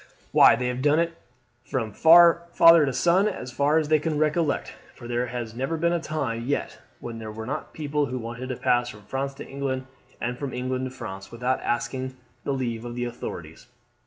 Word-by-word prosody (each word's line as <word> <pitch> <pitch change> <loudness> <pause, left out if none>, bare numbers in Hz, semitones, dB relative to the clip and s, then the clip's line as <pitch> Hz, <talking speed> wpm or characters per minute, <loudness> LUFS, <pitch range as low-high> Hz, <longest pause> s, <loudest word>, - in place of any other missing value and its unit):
Why - - +7
they 125 - -2
have 125 +1 -3
done 145 +2 +3
it 170 0 +1 0.5
from 115 -5 -3
father 170 0 +7
to - - 0
son 180 +8 +3
as 130 -11 -5
far 145 +4 +2
as 155 -2 +1
they 155 0 +4
can 155 0 -2
recollect, 155 0 0 0.2
for 120 - -10
there 120 +1 -1
has 120 -2 -5
never 135 +7 -2
been 170 +2 +1
a 170 - +1
time 135 -8 -3
yet 145 - -2 0.2
when 115 -1 -7
there 110 -1 -6
were 110 +1 -7
not 130 - -5
people 150 -1 -1
who 130 +1 -4
wanted 120 +2 -6
to 130 - -2
pass 120 0 +1
from 105 -3 -11
France 135 +5 -3
to 140 - -9
England 135 -1 -3 0.3
and 125 +1 -3
from 140 -2 -4
England 130 +1 -2
to - - -4
France 100 -7 -8
without 125 +2 -1
asking 130 +2 -2 0.3
the - - 0
leave 120 -4 -2
of 120 0 -6
the 120 0 -2
authorities. 85 -9 -7
130 Hz, 205 wpm, -25 LUFS, 120-150 Hz, 0.5 s, Why